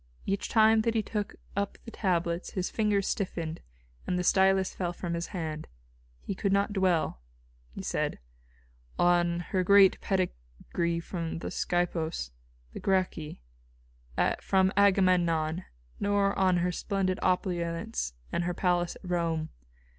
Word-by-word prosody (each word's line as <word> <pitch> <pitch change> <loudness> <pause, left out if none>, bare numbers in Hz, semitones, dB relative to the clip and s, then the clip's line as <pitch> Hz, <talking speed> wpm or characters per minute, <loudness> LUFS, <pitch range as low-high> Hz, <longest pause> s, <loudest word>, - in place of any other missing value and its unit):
Each 195 0 -1
time 220 0 +5
that 230 +1 0
he 220 - +2
took 210 -1 -3 0.2
up 200 0 -2
the 230 - -8
tablets 175 -4 -1
his 185 -2 -2
fingers 210 -3 +1
stiffened 165 -4 -3 0.5
and 180 - 0
the 180 - 0
stylus 190 0 +3
fell 175 -2 -2
from 175 -1 -4
his 170 0 -2
hand. 155 -4 -5 0.6
He - - -3
could 195 +1 -1
not 200 +1 +2
dwell," 180 - +1 0.5
he - - -8
said, - - -1 0.8
"on 175 -1 +3
her 185 -3 +2
great 200 0 +6
pedigree 170 - -2
from 165 -2 -4
the - - -5
Scipios, 165 - -1 0.4
the - - -6
Gracchi, 180 - -1 1.0
from 190 0 +2
Agamemnon, 180 -4 +3 0.3
nor 200 -1 +2
on 185 -2 +3
her 180 +1 +1
splendid 190 0 -1
opulence 170 - -1 0.2
and 170 - 0
her 175 0 -1
palace 175 -2 +1
at 185 - -12
Rome. 165 -3 -1
180 Hz, 135 wpm, -29 LUFS, 170-195 Hz, 1.0 s, great